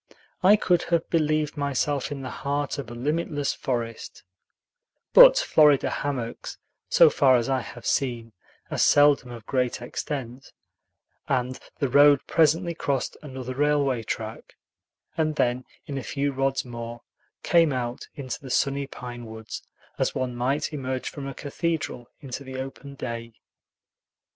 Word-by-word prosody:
I 200 +2 +7
could 180 -4 +2
have 170 -1 +1
believed 155 -2 +1
myself 145 0 -1
in 140 -2 -5
the 130 - -5
heart 145 +1 -2
of 135 - -6
a 120 - -8
limitless 145 +2 -1
forest; 115 -3 -4 0.9
but - - +10
Florida 150 - +4
hammocks, 130 -5 -4 0.3
so - - +7
far 130 -2 +5
as 120 0 +1
I 135 -1 +2
have 120 0 -10
seen, 120 -4 -1 0.4
are - - -2
seldom 145 -3 +5
of 115 -3 -9
great 125 -2 0
extent, 130 +1 -6 0.8
and 130 -1 0 0.2
the 140 - 0
road 145 +1 +5
presently 165 +2 +2
crossed 140 -5 -2
another 130 -3 -6
railway 140 -3 +1
track, 110 0 -6 0.6
and 155 -1 +1
then, 125 -2 0 0.2
in 140 -2 -4
a - - -7
few 140 +4 -1
rods 135 0 0
more, 120 -1 -7 0.4
came 165 -3 +4
out 125 -1 -3
into 130 -5 -5
the 135 - -9
sunny 140 +2 0
pine 120 -3 -8
woods, 110 0 -8 0.4
as - - 0
one 125 -1 -2
might 135 +6 -1
emerge 130 -2 -3
from 140 -2 -7
a 135 - -6
cathedral 145 -4 -3
into 135 0 -6
the 130 -1 -7
open 135 +1 -7
day. 115 -3 -6
135 Hz, 145 wpm, -25 LUFS, 125-145 Hz, 0.9 s, but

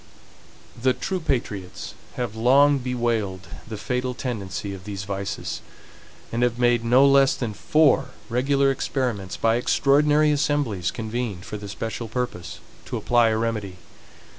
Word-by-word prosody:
The 130 +1 +3
true 190 -1 -2
patriots 105 - -3 0.2
have 120 -3 -3
long 140 +5 +5
bewailed 115 -7 -2 0.2
the 110 -1 -6
fatal 125 +3 -2
tendency 100 -5 -4
of 95 -1 -9
these 100 -2 -5
vices, 100 0 -4 0.7
and 115 - -1
have 120 -1 +2
made 120 -1 +3
no 125 +4 +5
less 140 -1 +5
than 115 -4 -3
four 150 +7 +3 0.2
regular 135 +4 +2
experiments 125 -8 -2
by 115 0 +2
EXTRAORDINARY 150 +4 +3
ASSEMBLIES, 140 - 0
convened 110 -5 -4
for 105 - -5
the 100 -1 -8
special 115 +3 -4
purpose, 115 -7 -4 0.3
to - - -4
apply 120 -2 +3
a 110 - +1
remedy. 105 -5 -2
120 Hz, 140 wpm, -24 LUFS, 105-135 Hz, 0.7 s, long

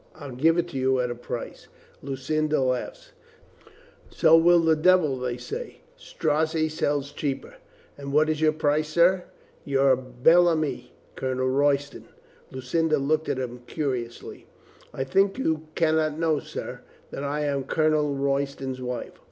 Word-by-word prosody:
I'll 145 -4 -9
give 160 +7 +2
it 175 -1 -2
you 130 0 +1
at 125 -1 -1
a - - -1
price." 120 0 -7 0.3
Lucinda 150 +3 -1
laughed. 135 - -3 1.0
"So 160 - +5
will 170 +1 +5
the 160 -1 +3
devil, 155 -4 +3
they 125 -1 -3
say." 480 - -7
"Strozzi 155 - -1
sells 145 -2 -1
cheaper." 145 - -4 0.4
"And 140 0 -6
what 150 +2 +3
is 155 -1 -1
your 155 -1 +4
price, 155 0 0
sir?" 175 +3 +3 0.4
"Your 135 -1 +3
bel 130 +8 +3
ami, 155 -7 -1 0.2
Colonel 130 0 -1
Royston." 140 +1 0 0.4
Lucinda 155 +5 0
looked 155 +3 0
at - - -1
him 125 -1 -5
curiously. 125 -6 -5 0.4
"I 135 - -3
think 195 - +1
you 160 -10 -1
can 160 -1 +2
not 155 -1 0
know, 160 -2 +1
sir, - - -7 0.3
that 140 - -5
I 145 +1 -2
am 140 -2 -1
Colonel 155 -1 +1
Royston's 135 -1 -2
wife." 125 -1 -5
150 Hz, 145 wpm, -25 LUFS, 130-160 Hz, 1.0 s, So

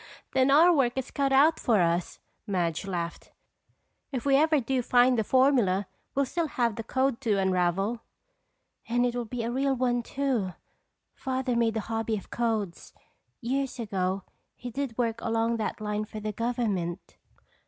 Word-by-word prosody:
"Then 265 0 +3
our 325 +6 +7
work 260 -6 +2
is 265 -1 -4
cut 275 -1 0
out 290 +4 +5
for 225 -4 +2
us," 170 0 0 0.3
Madge 175 -2 -1
laughed. 170 -3 -4 0.8
"If 260 -2 -4
we 275 -1 +4
ever 310 +1 +4
do 260 +1 0
find 245 +1 +4
the 220 - +1
formula 240 -7 +3 0.3
we'll 280 0 +2
still 335 +5 -1
have 235 -6 0
the 225 - -5
code 260 +1 0
to 220 -6 +1
unravel." 190 +4 +1 0.9
"And 245 +1 +2
it 245 - 0
will 240 -1 -2
be 235 +1 -4
a 230 - -2
real 270 +2 +1
one 245 -1 +1
too! 240 -7 -1 0.6
Father 260 -2 -2
made 230 -1 +1
a - - -1
hobby 225 0 -2
of 195 - -11
codes. 220 -7 -2 0.5
Years 265 +2 -2
ago 195 -4 -2 0.3
he 245 0 -7
did 265 -2 -4
work 230 -2 -1
along 230 +1 0
that 220 0 -3
line 210 0 -2
for 215 0 -8
the 215 0 -3
government." 210 -6 -2
235 Hz, 165 wpm, -28 LUFS, 210-260 Hz, 0.9 s, our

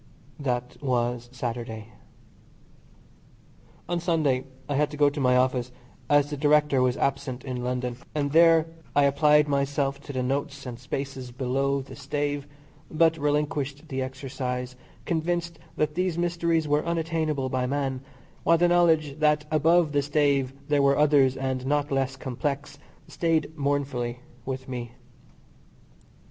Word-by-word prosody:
That 125 -3 -2
was 120 -3 -1
Saturday. 115 -3 -5 2.0
On 175 0 -1
Sunday 155 -7 +1 0.2
I 145 - -2
had 150 +1 +2
to 150 - -8
go 145 -1 +4
to 145 - -5
my 125 -2 +4
office, 125 -1 +1 0.4
as 145 0 +4
the 145 - -3
Director 150 -2 +3
was 125 +1 +2
absent 135 -2 -1
in 125 -2 -4
London, 125 -1 -2 0.2
and 140 -2 0
there 165 0 +6 0.3
I 145 - +5
applied 150 +1 +4
myself 140 0 0
to 145 - -8
the 130 -2 -2
notes 140 +2 -2
and 120 -2 -6
spaces 135 0 -5
below 135 +2 0
the 135 - -11
stave, 145 +1 -3 0.4
but 160 0 +3
relinquished 145 0 -1
the 130 -1 -2
exercise, 130 -1 -4 0.3
convinced 170 0 -1 0.2
that 150 0 0
these 180 0 -1
mysteries 170 -2 +1
were 150 +1 +2
unattainable 160 -5 -1
by 125 0 -1
man, 135 -1 -2 0.4
while 170 +1 +4
the 175 +1 +4
knowledge 160 -4 +3
that 150 -1 +3
above 160 +1 +4
the 145 -1 +2
stave 140 -2 +1 0.2
there 145 -1 +3
were 140 0 +4
others 140 -3 +4
and 130 -1 -2
not 145 0 0
less 135 -1 0
complex, 140 +2 -4 0.3
stayed 160 -2 0
mournfully 140 -4 -1 0.3
with 130 0 -4
me. 120 -2 -5
140 Hz, 140 wpm, -26 LUFS, 130-150 Hz, 2.0 s, there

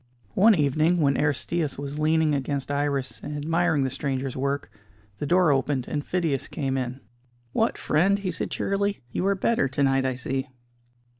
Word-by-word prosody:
One 215 +2 +6
evening, 155 +3 +2
when 140 -3 +3
Aristćus 150 +1 0
was 140 +1 -5
leaning 155 0 +3
against 140 0 -2
Iris, 140 -2 -1
and 150 0 -5
admiring 160 0 +1
the 130 - -1
stranger's 135 -1 -2
work, 140 +2 -2 0.5
the 145 - -2
door 180 -1 +4
opened 135 -1 0
and 145 -1 -2
Phidias 165 -7 -1
came 135 -4 -2
in. 130 0 -3 0.5
"What, 225 - +1
friend," 190 +6 +2
he 195 -2 -3
said 165 - -3
cheerily, 200 -4 -1
"you 185 - -1
are 200 - +3
better 195 -5 +1
to 135 +2 -1
night 135 -1 +2
I 130 - -1
see!" 130 +2 -3
145 Hz, 170 wpm, -25 LUFS, 135-170 Hz, 0.5 s, One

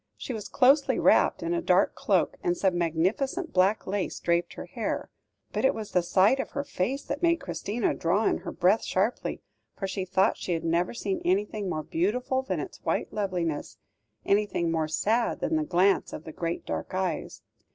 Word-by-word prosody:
She 255 - -5
was 215 -3 -6
closely 275 +2 +4
wrapped - - +3
in 335 - -1
a 340 - 0
dark - - +3
cloak, - - +1
and 355 -1 +1
some 190 - +1
magnificent 190 - 0
black 190 +3 +3
lace 195 0 -2
draped 170 0 0
her - - -7
hair. - - -4 0.4
But - - -1
it 265 - +3
was 215 -2 -6
the 180 - +3
sight 190 +9 +3
of - - -4
her 280 - -2
face 275 0 -2
that 285 - -4
made 340 -1 +4
Christina 200 +7 -2
draw 190 +6 +1
in - - +2
her - - -6
breath 195 +5 +2
sharply, 200 +6 -1 0.3
for 195 - -3
she 190 0 -3
thought 190 +1 +2
she 180 - -2
had 165 -1 -2
never 170 +6 0
seen 200 -4 -2
anything 200 +1 0
more 155 -3 -2
beautiful 250 +12 0
than 265 - -3
its - - -7
white - - -1
loveliness, 180 -7 -2 0.5
anything 200 -5 +1
more 160 -1 0
sad 220 +9 0
than 320 - 0
the 315 - +1
glance 195 - +2
of - - -6
the 160 - -8
great 170 +2 -4
dark - - -4
eyes. 185 -4 -3
195 Hz, 195 wpm, -27 LUFS, 175-250 Hz, 0.5 s, closely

